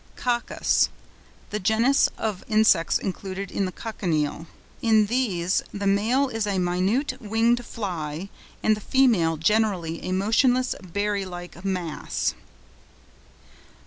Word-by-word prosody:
COCCUS.—The 240 -3 -2
genus 225 +7 +3
of 210 -4 -3
Insects 215 -6 +4
including 195 +1 -3
the 185 - -3
Cochineal. 165 -7 -2 0.3
In 220 -2 +4
these 200 -7 0
the 200 0 -4
male 220 +8 +2
is 225 -4 -2
a 200 -2 0
minute, 195 +10 0
winged 230 +2 +2
fly, 180 -6 -5 0.3
and 215 - +4
the 210 - -9
female 205 -12 +3
generally 180 -2 +1
a - - -3
motionless, 245 +6 +2
berry 200 +2 -1
like 175 -1 -9
mass. 180 -5 -2
200 Hz, 110 wpm, -25 LUFS, 180-225 Hz, 0.3 s, Insects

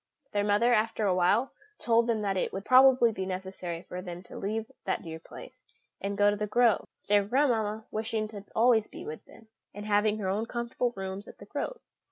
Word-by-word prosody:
Their 205 0 +1
mother, 210 +4 +3
after 220 -1 +1
a 190 - +3
while, 200 +8 +2 0.3
told 230 0 +2
them 225 -2 +1
that 200 -2 0
it 185 - -1
would 195 +2 -6
probably 255 -2 +6
be 190 -3 -4
necessary 185 -2 -5
for 180 - -7
them 175 -1 -8
to - - -12
leave 220 +3 -3
that - - -1
dear 160 -1 -7
place, - - -12 0.4
and 200 0 -3
go 205 0 +5
to - - -1
The 210 0 -3
Grove, 235 0 +3 0.2
their 205 0 +4
grandmamma 220 -3 +1
wishing 220 0 -2
to 205 -2 -8
be 200 - -25
always 225 -2 +4
with 155 - -8
them, 225 - -17 0.3
and 205 0 -7
having 210 0 +2
her 200 -3 -3
own 210 +4 -1
comfortable 240 0 -2
rooms 195 +1 -5
at - - -12
The - - -12
Grove. - - -4
210 Hz, 210 wpm, -29 LUFS, 195-230 Hz, 0.4 s, probably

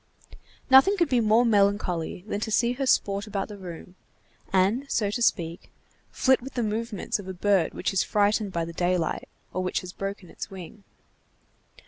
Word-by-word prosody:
Nothing 325 +10 +7
could 340 -5 +2
be 250 - +3
more 225 +2 +4
melancholy 200 -6 +1
than 205 -1 -3
to 220 - -3
see 235 +2 +2
her 270 +1 -3
sport 200 -3 +1
about 200 -1 -3
the 205 - -8
room, 180 -1 -9 0.6
and, 205 +9 +2
so 205 -3 0
to 240 - -3
speak, 170 -7 0 0.4
flit 260 -1 +2
with 265 +2 -9
the 240 - 0
movements 220 -1 -2
of 195 - -9
a 190 - -6
bird 190 -2 +1
which 190 - -2
is 195 - +3
frightened 205 0 +1
by 170 -2 -2
the 170 - -8
daylight, 175 0 -1 0.2
or 185 - -1
which 185 - -1
has 185 0 -9
broken 195 -2 -6
its - - -7
wing. 195 +2 -10
205 Hz, 180 wpm, -26 LUFS, 185-230 Hz, 0.6 s, Nothing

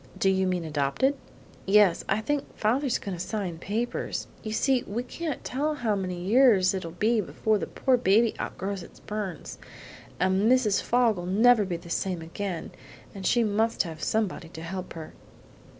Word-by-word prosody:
"Do 195 - +3
you 190 0 +1
mean 180 -2 -1
adopted?" 150 - +1 0.5
"Yes; 200 -3 +5
I 200 +2 +1
think 290 +5 -3
father's 250 +4 +1
going 195 -2 -5
to 175 - -4
sign 185 -6 -4
papers. 225 +7 -3 0.2
You 215 - -5
see 260 +3 +2
we 230 +5 -3
can't 305 +3 -5
tell 300 +4 -1
how 230 -7 0
many 185 -2 -3
years 200 -1 +4
it'll 185 -3 -4
be 215 +7 +1
before 215 +2 0
the - - -3
poor 260 -2 +2
baby 225 0 +3
outgrows 195 0 -4
its - - -13
burns, 210 -5 -6 0.6
and 190 +5 +3
Mrs. 220 -6 +3
Fogg'll 225 -7 +1
never 220 +3 +5
be 180 -2 -3
the 170 0 -11
same 180 -3 -2
again, 175 +1 -5 0.4
and 195 -1 -4
she 240 - +3
must 220 +2 +1
have 160 -3 -8
somebody 205 -6 -1
to 160 -1 -9
help 185 +2 -6
her." 160 -1 -9
200 Hz, 170 wpm, -27 LUFS, 180-230 Hz, 0.6 s, Yes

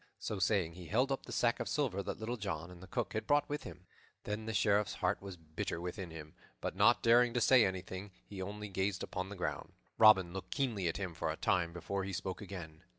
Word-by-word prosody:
So 105 - -4
saying, 90 -3 +2
he 90 -1 -10
held 125 - +2
up 135 - -2
the - - -7
sack 120 0 +2
of 120 - -2
silver 130 -10 0
that - - -4
Little 115 +2 -2
John 90 -6 -4
and 90 -1 -12
the 95 - -10
Cook - - -2
had 110 0 -3
brought 145 0 +3
with 145 +1 -3
them. 90 +1 -10 0.4
Then 105 +1 -4
the - - -1
Sheriff's 105 -1 +3
heart - - 0
was 95 -2 -7
bitter 80 +1 -4
within 90 +1 -5
him; 75 -1 -9 0.3
but, - - -3
not - - +5
daring 120 +1 +5
to - - +3
say 125 0 +6
anything, 95 +1 -3 0.2
he 100 -2 -7
only 105 +2 -5
gazed 95 0 -1
upon 95 +1 -4
the 100 - -6
ground. 90 -1 -3 0.3
Robin 95 -5 +7
looked 95 -1 -6
keenly 115 -10 0
at 85 - -1
him 95 -4 -3
for 85 - -2
a - - -2
time 85 -2 +1
before 90 +3 -3
he 95 0 -4
spoke 95 +2 -4
again. 90 -6 -8
95 Hz, 235 wpm, -34 LUFS, 90-110 Hz, 0.4 s, Robin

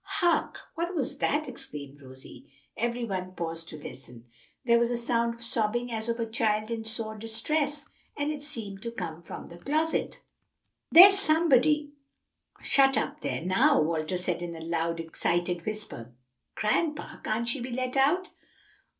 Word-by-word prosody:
"Hark! 345 -2 +1
what 345 +2 -3
was 280 -5 -1
that?" 300 +1 0
exclaimed 145 - -7
Rosie. 130 0 -11 0.2
Every 235 +1 -1
one 185 -3 -4
paused 165 -1 -3
to 155 - -6
listen. 125 -4 -10 0.4
There 235 -1 +5
was 235 0 +2
a 240 - 0
sound 235 -1 0
of 235 - -8
sobbing 235 +1 +2
as 220 0 -3
of 230 +1 -1
a 230 - 0
child 220 -1 0
in 225 -1 -3
sore 220 -1 0
distress, 285 +7 0 0.3
and 290 +1 -1
it 295 -2 -5
seemed 225 -10 -3
to 235 - -3
come 165 -7 -6
from 170 - -9
the 170 - -12
closet. 310 - -1 0.7
"There's 390 +4 +9
somebody 305 -4 +3 0.7
shut 270 -1 +5
up - - -2
there - - -3
now," 185 +1 +4
Walter 160 +3 0
said 180 -1 -1
in 170 -1 -5
a - - -8
loud, 165 0 -2
excited 175 +2 -1
whisper. 210 - -5 0.4
"Grandpa, 300 +8 -1
can't 225 +2 -2
she 255 +4 +1
be 245 +2 -5
let 255 +1 -2
out?" 310 +8 +2
230 Hz, 160 wpm, -28 LUFS, 175-280 Hz, 0.7 s, There's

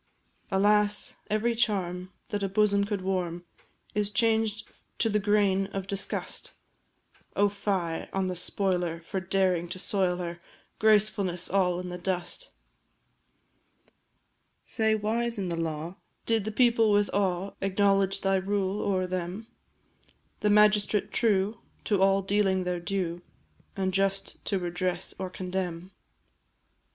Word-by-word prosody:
Alas 205 +1 +2
every 215 +3 +1
charm 185 -5 -1 0.2
that 205 -3 -2
a 195 - -1
bosom 200 0 +3
could 205 -2 -2
warm 180 -2 -2 0.5
Is 210 -1 +1
changed 220 0 +1 0.3
to 225 - +2
the 210 0 +2
grain 200 -2 +2
of 195 -1 -5
disgust! 195 0 -2 0.8
Oh, 205 0 +4
fie 195 -5 -2
on 195 0 0
the 185 -1 -2
spoiler 180 -2 -1
for 190 +3 -3
daring 185 -2 +1
to - - -5
soil 185 -2 +1
her 175 -1 -5 0.4
Gracefulness 205 -4 +2
all 180 -2 +2
in 180 0 -5
the 180 0 -6
dust! 185 - -2 2.2
Say, 220 -1 +1
wise 230 +2 -1
in 190 -3 -2
the 170 - -1
law, 165 +2 -4 0.3
did 225 -3 +1
the 215 - -2
people 230 -1 +4
with 205 0 +3
awe 195 -1 0
Acknowledge 195 0 +2
thy 195 0 +2
rule 195 +1 -1
o'er 190 -2 0
them 185 +3 -4 1.0
A 210 - +2
magistrate 210 0 +4
true, 210 -1 +1 0.2
to 200 -3 +1
all 195 0 +4
dealing 195 -1 +2
their 180 -1 -2
due, 175 -2 -2 0.5
And 190 -1 -1
just 195 +1 0
to 200 - 0
redress 180 0 -2
or 190 -1 -3
condemn? 180 -1 -4
195 Hz, 130 wpm, -28 LUFS, 180-210 Hz, 2.2 s, Oh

